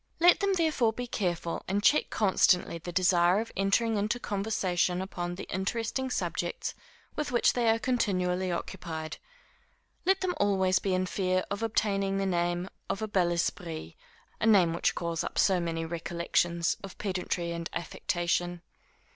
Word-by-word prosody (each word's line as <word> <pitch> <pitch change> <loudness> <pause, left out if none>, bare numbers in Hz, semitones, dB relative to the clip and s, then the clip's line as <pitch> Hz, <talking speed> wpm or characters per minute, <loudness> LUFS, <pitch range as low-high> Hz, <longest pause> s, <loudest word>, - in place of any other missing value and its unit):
Let 350 +1 +6
them 400 -1 +2
therefore 310 -10 +2
be 245 +2 -4
careful, 175 -7 -2
and 200 +2 0
check 300 - +4
constantly 185 -4 +2
the 175 +2 -7
desire 180 +1 +4
of 230 - -4
entering 210 +3 +2
into 210 +4 0
conversation 195 -5 0
upon 175 -2 -4
the 190 - -6
interesting 225 +7 -2
subjects 470 - -2 0.4
with 300 -3 -2
which 240 - +3
they 240 -2 +2
are 225 - +4
continually 185 -7 0
occupied. 165 -3 -5 0.9
Let 385 +2 +2
them 370 -1 0
always 190 -2 +2
be 190 -2 0
in 185 0 +1
fear 185 0 0
of 200 +1 -2
obtaining 200 -3 0
the 195 - 0
name 175 -1 0 0.2
of 200 - -2
a - - -1
bel 185 -4 +2
esprit, 165 - -3 0.5
a 220 - +1
name 185 -6 +5
which 170 - +1
calls 170 -1 -2
up - - -5
so 190 -2 +4
many 165 -1 -2
recollections 170 0 0
of 195 - -9
pedantry 180 -3 -2
and 170 0 -4
affectation. 175 0 -2
190 Hz, 155 wpm, -29 LUFS, 175-220 Hz, 0.9 s, Let